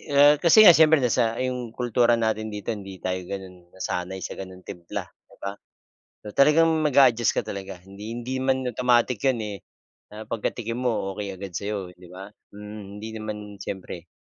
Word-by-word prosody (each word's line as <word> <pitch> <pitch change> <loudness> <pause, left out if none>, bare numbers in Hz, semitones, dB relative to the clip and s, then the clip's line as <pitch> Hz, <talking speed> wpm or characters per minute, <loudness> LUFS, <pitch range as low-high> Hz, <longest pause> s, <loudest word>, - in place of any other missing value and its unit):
Eh, 145 +1 +7
kasi 170 +5 +5
nga 180 -5 +10
siyempre 160 -1 +6
nasa 115 -2 +1
'yong 125 -3 -3
kultura 120 0 +2
natin 110 -1 -1
dito, 105 +1 -6
hindi 100 -3 -9
tayo 95 0 -1
gano'n 90 -2 -9
nasanay 95 0 -4
sa - - -5
gano'ng 95 -1 -9
timpla, 85 -3 -6
'di - - -25
ba? 100 - -3 0.7
So 105 - -7
talagang 150 +4 +5 0.2
mag-a-adjust 125 -6 +4
ka - - +3
talaga 95 -1 -6
hindi 100 +3 -10
hindi 125 +2 -4
man 130 0 +1
automatic 125 -1 +2
'yon 130 -3 +2
eh, 105 -1 -5 0.5
na 110 +1 -9
pagka-tikim 115 +1 -3
mo 110 -6 -1
okey 100 -2 -5
agad 95 -1 -8
sa'yo, 100 0 -4
'di 90 0 -16
ba? 95 +2 -10 0.2
Mm, 105 0 -9 0.2
hindi 110 +1 -6
naman 110 -1 -5 0.2
siyempre 90 -4 -7
110 Hz, 175 wpm, -25 LUFS, 95-125 Hz, 0.7 s, nga